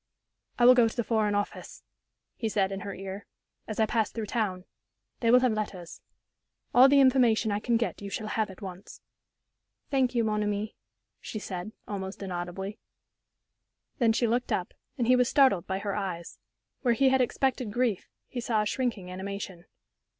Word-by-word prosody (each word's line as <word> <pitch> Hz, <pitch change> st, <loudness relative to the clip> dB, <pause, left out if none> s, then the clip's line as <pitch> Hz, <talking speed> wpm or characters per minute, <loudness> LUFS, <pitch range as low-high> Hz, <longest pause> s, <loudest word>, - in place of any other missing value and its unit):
"I 240 Hz, -, +4 dB
will 250 Hz, -, +10 dB
go 240 Hz, -2 st, +5 dB
to 225 Hz, -, -6 dB
the 240 Hz, -, 0 dB
Foreign 215 Hz, -2 st, +1 dB
Office," 205 Hz, 0 st, -4 dB, 0.5 s
he 225 Hz, -, -2 dB
said, 195 Hz, -2 st, +1 dB
in 195 Hz, -, -3 dB
her 200 Hz, -1 st, -6 dB
ear, 195 Hz, +1 st, -7 dB, 0.4 s
"as 215 Hz, -, -5 dB
I 220 Hz, -, +5 dB
pass 220 Hz, 0 st, 0 dB
through 225 Hz, -2 st, -4 dB
town. 200 Hz, -5 st, -2 dB, 0.5 s
They 230 Hz, -, +1 dB
will 250 Hz, +2 st, +7 dB
have 255 Hz, -2 st, +3 dB
letters. 200 Hz, -5 st, -5 dB, 0.7 s
All 255 Hz, +2 st, +8 dB
the 280 Hz, 0 st, +6 dB
information 245 Hz, -5 st, +4 dB
I 205 Hz, -, 0 dB
can 235 Hz, +2 st, +1 dB
get 235 Hz, -2 st, -2 dB
you 200 Hz, -, -5 dB
shall 215 Hz, +2 st, -4 dB
have 220 Hz, 0 st, 0 dB
at 190 Hz, +1 st, -11 dB
once." 185 Hz, 0 st, -9 dB, 0.9 s
"Thank 260 Hz, -3 st, +2 dB
you, 235 Hz, -, +3 dB
mon 210 Hz, -1 st, 0 dB
ami", 210 Hz, +1 st, -2 dB, 0.4 s
she -, -, -6 dB
said, 190 Hz, -1 st, -5 dB, 0.2 s
almost 195 Hz, -1 st, -5 dB
inaudibly. 185 Hz, +3 st, -5 dB, 1.2 s
Then 235 Hz, -3 st, +4 dB
she 235 Hz, +2 st, +1 dB
looked 240 Hz, +2 st, 0 dB
up, 180 Hz, -, -1 dB, 0.2 s
and 245 Hz, -, +1 dB
he 250 Hz, +2 st, +5 dB
was 250 Hz, 0 st, +3 dB
startled 260 Hz, -, +4 dB
by 190 Hz, -, -1 dB
her 200 Hz, 0 st, -3 dB
eyes. 180 Hz, -4 st, -5 dB, 0.4 s
Where 240 Hz, -1 st, +2 dB
he 270 Hz, +2 st, +4 dB
had 265 Hz, 0 st, +3 dB
expected 250 Hz, -2 st, 0 dB
grief, 235 Hz, -3 st, 0 dB, 0.2 s
he 245 Hz, -, -5 dB
saw 225 Hz, -2 st, +1 dB
a -, -, -4 dB
shrinking 210 Hz, -6 st, -2 dB
animation. 190 Hz, -1 st, -6 dB
215 Hz, 180 wpm, -28 LUFS, 195-240 Hz, 1.2 s, will